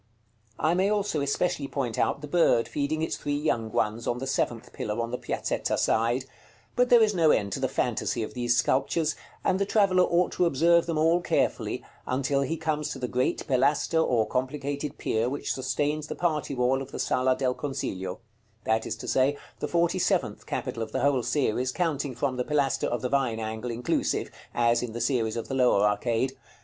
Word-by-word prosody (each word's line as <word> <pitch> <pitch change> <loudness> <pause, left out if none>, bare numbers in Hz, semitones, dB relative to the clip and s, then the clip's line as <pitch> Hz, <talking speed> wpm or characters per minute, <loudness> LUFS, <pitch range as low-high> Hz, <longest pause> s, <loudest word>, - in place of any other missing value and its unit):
I 155 +3 +2
may 190 +3 +2
also 205 -7 0
especially 140 +1 0
point 130 -6 -3
out 115 +5 +1
the 150 - -6
bird 145 -7 +3
feeding 150 +2 -1
its - - -2
three 145 0 -2
young 120 -7 -1
ones 105 +4 -1
on 120 - 0
the 130 - -4
seventh 120 -3 -2
pillar 105 +2 -3
on 115 0 -2
the 125 - -2
Piazzetta - - -2
side; 120 +3 +1 0.5
but 250 0 +3
there 240 -2 +7
is 210 -1 +2
no 165 -4 +4
end 100 -8 +2
to - - -2
the - - +1
fantasy 115 - -1
of - - -6
these 120 -1 +1
sculptures; 150 +5 +1 0.3
and 190 - +1
the - - +3
traveller 195 -4 +4
ought 180 0 +2
to 180 - +2
observe 170 +3 +3
them 165 -2 -1
all 165 +3 +3
carefully, - - 0 0.2
until 135 +2 +1
he 160 +4 -1
comes 155 -1 -1
to 140 - -5
the 125 -1 -3
great 125 +1 -1
Pilaster 140 +5 +2
or 115 -6 +2
complicated 140 +3 -3
pier 115 +2 0
which 140 +2 -2
sustains 145 +3 -1
the - - -5
party 155 -5 -1
wall 125 +2 +2
of 135 0 -8
the - - -6
Sala 130 0 +1
del 130 -2 +1
Consiglio; 95 -10 -4 0.4
that 110 +1 0
is - - -2
to - - -9
say, 135 +2 +2 0.2
the - - -2
forty 175 +2 +1
seventh - - 0
capital 115 - -3
of 110 -1 -4
the - - 0
whole 140 -3 +3
series, 125 0 0
counting 145 -5 -1
from 130 0 -1
the 125 - 0
pilaster 140 -1 +1
of 120 -1 -2
the 125 - 0
Vine 130 -5 +1
angle 110 +2 -4
inclusive, 120 +1 -1 0.2
as 120 0 +2
in 120 -3 -4
the 120 - -4
series 120 -3 0
of 115 - -4
the - - -5
lower 125 -6 +4
arcade. 115 +5 0
135 Hz, 205 wpm, -27 LUFS, 120-155 Hz, 0.5 s, there